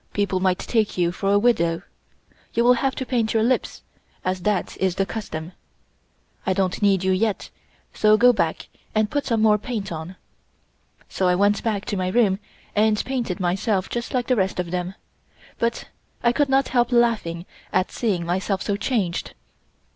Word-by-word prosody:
People 200 -2 0
might 185 -1 +2
take 220 -5 0
you 175 -1 +2
for 195 +2 -1
a 200 - +5
widow. 175 -7 +2 0.7
You 235 - +3
will 245 +1 +6
have 265 +2 0
to 260 - -3
paint 230 -3 0
your 220 - +3
lips, 255 +2 0 0.4
as 185 0 -1
that 205 0 -1
is 190 -2 0
the 195 - +1
custom. 175 -7 -6 0.9
I 190 - +1
don't 185 0 -1
need 195 -2 +3
you 190 - +2
yet, 200 +2 0 0.4
so 215 0 +4
go 245 +2 +6
back 165 -7 -1 0.3
and 215 -1 +2
put 290 -1 -1
some 225 -3 +1
more 210 -1 +5
paint 215 -4 -4
on." 165 +3 -6 0.9
So 185 - 0
I 180 - +3
went 205 +2 +2
back 210 -3 -2
to 205 - -2
my 185 0 -1
room 195 -1 +2 0.4
and 215 0 +2
painted 245 -9 -2
myself 185 +2 0
just 240 0 -3
like 250 -2 0
the 255 - +2
rest 190 -4 0
of 175 -2 -3
them, 180 +1 -3 0.6
but 235 0 -1 0.4
I 235 - +5
could 285 +3 +1
not 270 0 +2
help 245 -1 +2
laughing 225 -8 +1 0.3
at 185 0 +1
seeing 195 -8 -1
myself 190 +2 -1
so 200 -1 -1
changed. 205 -6 -1
205 Hz, 180 wpm, -23 LUFS, 185-235 Hz, 0.9 s, will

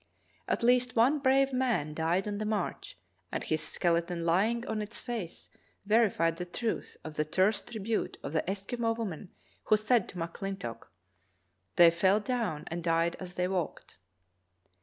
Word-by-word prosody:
At - - -1
least 250 +1 +3
one 255 +6 +4
brave 270 0 +3
man 240 - 0
died 165 +5 0
on 205 -1 -3
the - - -1
march, 210 -4 -3 0.3
and - - -2
his 155 - 0
skeleton 170 0 0
lying 215 +8 +2
on 220 -1 -2
its 210 +3 -6
face 225 -9 -6 0.3
verified 200 -7 +3
the 180 - -4
truth 220 +6 -3
of 155 - -7
the 150 - 0
terse 190 +7 +2
tribute 225 -1 -3
of - - -5
the 160 - +2
Eskimo 225 +4 -1
woman 195 -5 -5 0.4
who 215 - +5
said 215 0 +2
to - - -12
McCHntock: 170 - -5 0.9
"They 170 -1 +8
fell 185 +5 +3
down 220 - -2
and 170 +1 -5
died 165 0 +2
as 180 -1 -8
they 180 0 0
walked. 180 - -4
195 Hz, 160 wpm, -30 LUFS, 170-230 Hz, 0.9 s, They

